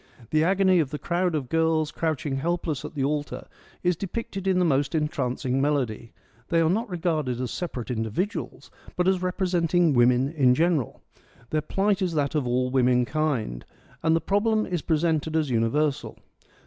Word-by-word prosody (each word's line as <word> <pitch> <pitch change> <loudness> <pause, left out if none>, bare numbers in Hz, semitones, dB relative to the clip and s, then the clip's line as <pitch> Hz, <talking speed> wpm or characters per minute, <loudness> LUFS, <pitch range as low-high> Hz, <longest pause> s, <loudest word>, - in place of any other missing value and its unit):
The 155 0 +3
agony 190 0 +3
of 150 -5 +1
the 150 - -4
crowd 175 +2 -1
of 140 -4 -2
girls 160 0 +1
crouching 150 -4 -2
helpless 160 -1 -2
at 150 - -8
the 140 - -1
altar 145 +1 -2 0.4
is 180 0 +2
depicted 195 +1 -5
in 190 -1 +3
the 180 - +3
most 145 0 +1
entrancing 135 -3 -1
melody; 130 -6 -1 0.4
they 165 - +2
are 165 0 +3
not 220 +4 -1
regarded 160 -8 -1
as 125 -1 -3
separate 130 -9 -4
individuals, 115 - -3 0.2
but 180 0 +1
as 190 -1 +2
representing 175 -3 +1
women 125 +1 +4
in 135 -5 +3
general; 160 -5 0 0.5
their 155 - +1
plight 195 +5 0
is 180 -3 -1
that 145 -2 0
of 145 -5 0
all 125 +1 0
womankind, 125 - +1 0.4
and 160 0 +3
the 165 - +1
problem 215 +4 +1
is 175 -3 -2
presented 160 -1 0
as 155 -4 +1
universal. 135 +6 0
155 Hz, 165 wpm, -25 LUFS, 135-175 Hz, 0.5 s, women